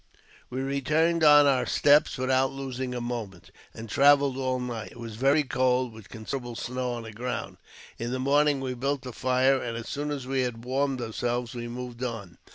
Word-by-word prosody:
We 130 +1 -3
returned 155 +5 +1
on 150 -1 +8
our 130 -3 +2
steps 145 +1 +4
without 130 +1 +1
losing 130 -2 -5
a - - -2
moment, 115 -7 -6 0.2
and 115 +1 -9
travelled 140 +3 +4
all 130 -1 -1
night. 120 -3 -5
It - - -14
was 115 -2 -7
very 135 +6 +3
cold, 130 -2 +1
with 110 -2 -13
considerable 120 +2 -6
snow 125 +1 -3
on 120 -1 -5
the 110 - -8
ground. 125 +4 -5 0.4
In 115 - -3
the 130 - -1
morning 140 +1 +2
we 130 -1 -3
built 135 +2 -2
a 125 - -5
fire, 130 +2 +2
and 115 -1 -4
as 115 0 -7
soon 145 +1 -3
as 140 -3 -4
we 135 0 0
had 120 -2 -4
warmed 135 0 0
ourselves 120 +1 -2
we 120 -1 -5
moved 125 0 -7
on. 105 -8 -5
130 Hz, 195 wpm, -27 LUFS, 120-135 Hz, 0.4 s, on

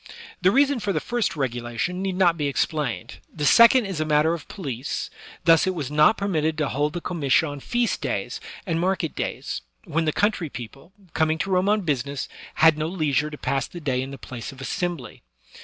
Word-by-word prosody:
The 185 - +5
reason 275 +3 +3
for 205 -2 -1
the - - +1
first 240 -6 -1
regulation 120 +5 -2
need 190 -1 -1
not 175 -3 +4
be 145 -3 -1
ex 140 - +2
plained; 125 - -4
the 150 -2 -3
second 235 - +7
is 190 -5 -4
a - - +2
matter 155 +1 +3
of 165 -3 -6
police; 140 - -4 0.3
thus 165 +2 +5
it 185 - 0
was 145 -5 -4
not 150 +8 +5
permitted 160 -6 0
to 150 -3 0
hold 145 +3 0
the 175 - -4
comitia 160 -4 +2
on 145 -1 -6
feast 240 - -1
days - - -3 0.2
and 165 -4 -1
market 180 -3 0
days, - - -3 0.2
when 165 +2 -1
the 155 - +2
country 200 -3 0
people, 135 - -9 0.2
coming 160 0 +2
to 190 +5 -3
Rome 185 +2 +2
on 210 0 +3
business, 140 -4 -2 0.3
had 160 -1 +5
no 155 - 0
leisure 150 -4 0
to 150 - -8
pass 135 -2 -1
the 175 - -9
day 130 -5 -1
in 130 - -5
the 140 - -8
place 120 0 -7
of 135 - -14
assembly. 155 - -4
155 Hz, 205 wpm, -24 LUFS, 140-185 Hz, 0.3 s, second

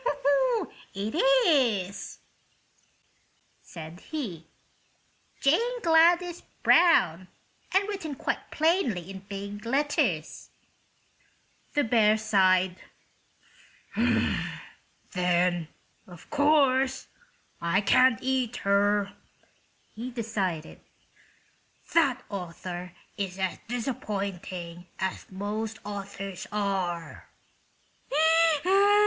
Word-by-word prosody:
"It 205 +3 -3 0.3
is," 220 - +1 1.4
said 165 0 -10
he. 195 - -6 0.9
"'Jane 470 - +2
Gladys 340 +1 +4 0.2
Brown;' 185 - +4 0.4
and 390 +2 +2
written 355 -8 -4
quite - - -3
plainly 280 - +1
in 190 - -7
big 200 +1 -6
letters." 280 +5 -1 1.3
The 290 - +3
bear 220 -2 +4
sighed. 190 -4 +3 2.4
"Then, 180 -2 +1 0.4
of 175 -2 -14
course, 275 -3 +3 0.6
I 170 +3 +2
can't 255 +4 +5
eat 255 -2 0
her," 200 0 +2 0.8
he 235 +4 -6
decided. 205 -9 -3 1.1
"That 280 -7 +3
author 180 -2 -6 0.2
is 195 -2 -3
as 190 -2 -2
disappointing 195 -7 -4
as 190 0 -3
most 210 +3 -4
authors 195 -2 -6
are." 190 -5 -3
205 Hz, 70 wpm, -27 LUFS, 185-265 Hz, 2.4 s, can't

